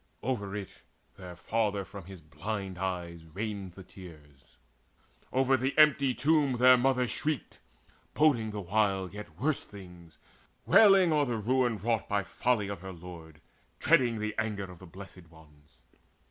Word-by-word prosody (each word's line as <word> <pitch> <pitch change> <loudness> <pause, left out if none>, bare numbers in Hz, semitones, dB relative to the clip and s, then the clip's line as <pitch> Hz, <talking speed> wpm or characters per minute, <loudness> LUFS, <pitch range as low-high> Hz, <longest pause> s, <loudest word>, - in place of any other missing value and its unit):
Over 105 -6 -3
it 100 -2 -5 0.5
Their 90 -2 -10
father 105 +1 -1
from 100 0 -10
his 95 -3 -12
blind 95 +3 -5
eyes 90 -3 -4
rained 100 +1 -5
the 95 - -11
tears: 75 -8 -15 0.7
Over 135 +1 +3
the 130 +3 -2
empty 140 -4 +5
tomb 145 0 +2
their 125 +1 +6
mother 125 0 +1
shrieked, 150 +3 -3 0.6
Boding 135 -8 +3
the 105 -1 -5
while 95 -1 0
yet 105 +1 -10
worse 145 +2 0
things, 90 -5 -13 0.5
wailing 195 -6 +6
o'er 150 -1 +3
The 120 -3 -2
ruin 120 +1 +1
wrought 110 +2 -1
by 100 -1 0
folly 110 +1 0
of 100 -3 -6
her 95 0 -7
lord, 85 -3 -12 0.4
Dreading 130 -7 +3
the 110 0 -3
anger 105 -3 -2
of 90 - -14
the 95 - -12
Blessed 90 -1 -12
Ones. 75 -2 -21
105 Hz, 150 wpm, -29 LUFS, 90-125 Hz, 0.7 s, their